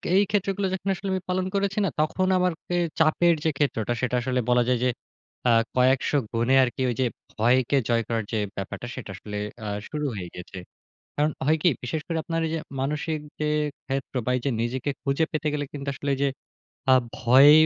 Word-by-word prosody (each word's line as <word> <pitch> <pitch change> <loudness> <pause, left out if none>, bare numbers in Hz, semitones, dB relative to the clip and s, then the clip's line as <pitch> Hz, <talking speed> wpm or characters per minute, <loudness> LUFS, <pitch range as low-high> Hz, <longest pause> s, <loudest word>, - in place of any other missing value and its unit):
এই 200 - +6
ক্ষেত্রগুলো 200 -1 0
যখন 190 +1 -2
আসলে 190 +1 -6
আমি 185 - -1
পালন 185 0 +1
করেছি 200 0 0
না - - +1
তখন 155 +5 +1
আমার 180 -1 +2
কে 175 - -1 0.2
চাপের 165 +2 +4
যে 160 - +3
ক্ষেত্রটা 120 -6 0
সেটা 125 -1 0
আসলে 130 0 0
বলা 125 0 +5
যায় 125 - +3
যে 125 - +3 0.6
আ - - +6 0.2
কয়েকশ 130 +1 +3 0.2
গুণে 120 +3 +3
আরকি 125 +1 -2
ওই 120 - -1
যে - - +3 0.3
ভয়কে 125 +4 +3
জয় 115 -1 +3
করার 115 -1 0
যে 115 - 0 0.2
ব্যাপারটা 95 +5 -5
সেটা 120 -6 -7
আসলে 105 +3 -6 0.3
আ - - -3 0.2
শুরু 150 -1 -3
হয়ে 90 -3 -5
গেছে। 90 +1 -9 0.6
কারণ 150 +1 +2 0.2
হয় 155 +2 +4
কি - - +6 0.2
বিশেষ 140 +6 -2
করে 165 -2 -1
আপনার 165 0 -1
এইযে 165 +1 -1 0.2
মানসিক 150 +3 -1 0.2
যে 150 - +1 0.4
ক্ষেত্র 135 0 -3
বা - - +1
এই - - -1
যে - - +3
নিজেকে 125 +4 -1
খুঁজে 140 +4 +2
পেতে 155 0 -2
গেলে 145 -1 -1
কিন্তু 140 -1 -6
আসলে 140 +1 -3
ওইযে 140 +1 +1 0.6
আ - - +9 0.2
ভয় 130 +4 +7
140 Hz, 195 wpm, -25 LUFS, 125-165 Hz, 0.6 s, আ